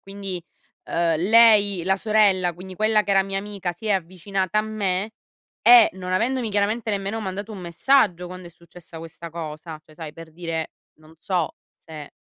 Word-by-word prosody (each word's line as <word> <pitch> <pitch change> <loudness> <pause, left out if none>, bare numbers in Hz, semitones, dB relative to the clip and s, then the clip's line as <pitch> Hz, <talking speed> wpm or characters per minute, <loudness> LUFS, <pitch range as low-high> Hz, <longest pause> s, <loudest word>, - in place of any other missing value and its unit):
quindi, 195 -3 -6 0.4
ehm, 165 -1 0
lei, 205 -1 +5
la 190 0 +2
sorella, 195 -4 +2
quindi 185 +2 -10
quella 215 +1 +2
che 205 - -4
era 195 0 +4
mia 195 0 -3
amica 195 -3 -5
si 195 +6 -11
è 210 - +2
avvicinata 185 +2 -2
a - - +5
me 210 -1 -2 0.5
e 235 0 +8
non 185 0 -6
avendomi 235 +3 0
chiaramente 210 +2 0
nemmeno 200 +2 -2
mandato 200 +1 -5
un 205 - -8
messaggio 180 +1 +2
quando 185 -1 -9
è - - -16
successa 170 0 -14
questa 165 +1 -10
cosa, 155 -1 -7
cioè 155 - -19
sai, 155 -2 -8
per 165 -1 -12
dire: 165 -1 -4 0.3
"Non 155 +1 -19
so 180 -3 -2 0.2
se 155 -3 -11
190 Hz, 175 wpm, -23 LUFS, 170-210 Hz, 0.5 s, e